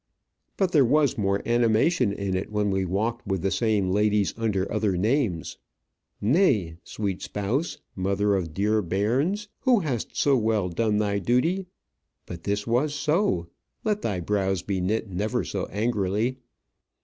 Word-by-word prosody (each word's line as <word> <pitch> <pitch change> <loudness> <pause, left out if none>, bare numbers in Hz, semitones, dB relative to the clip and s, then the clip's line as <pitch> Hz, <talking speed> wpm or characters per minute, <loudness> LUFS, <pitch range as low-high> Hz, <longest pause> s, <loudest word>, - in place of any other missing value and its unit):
But 190 -3 +1
there 150 -5 +5
was 145 +2 +3
more 100 -1 0
animation 120 - +3
in 100 -2 -2
it 95 - -3
when 105 -1 0
we 95 0 0
walked 110 +6 -2
with 95 -3 -1
the 95 - +1
same 105 -5 +1
ladies 105 0 +2
under 105 -4 0
other 105 -4 +1
names. 105 - 0 0.6
Nay, 110 - +2
sweet 100 -3 -4
spouse, 115 - -2 0.2
mother 100 +2 +1
of 90 -5 -1
dear 105 +5 +1
bairns, 125 - 0
who 250 -6 +3
hast 130 - -3
so 140 -1 +4
well 110 -5 +1
done 105 +4 0
thy 100 -1 0
duty; 165 - +1 0.6
but 85 -1 -9
this 100 0 -1
was 130 +6 +1
so, 150 - +1 0.4
let 210 -1 0
thy 100 -4 -1
brows 95 -1 0
be 95 -2 -2
knit 110 +5 -1
never 100 +3 -1
so - - -3
angrily. 105 +3 -1
105 Hz, 150 wpm, -25 LUFS, 95-125 Hz, 0.6 s, there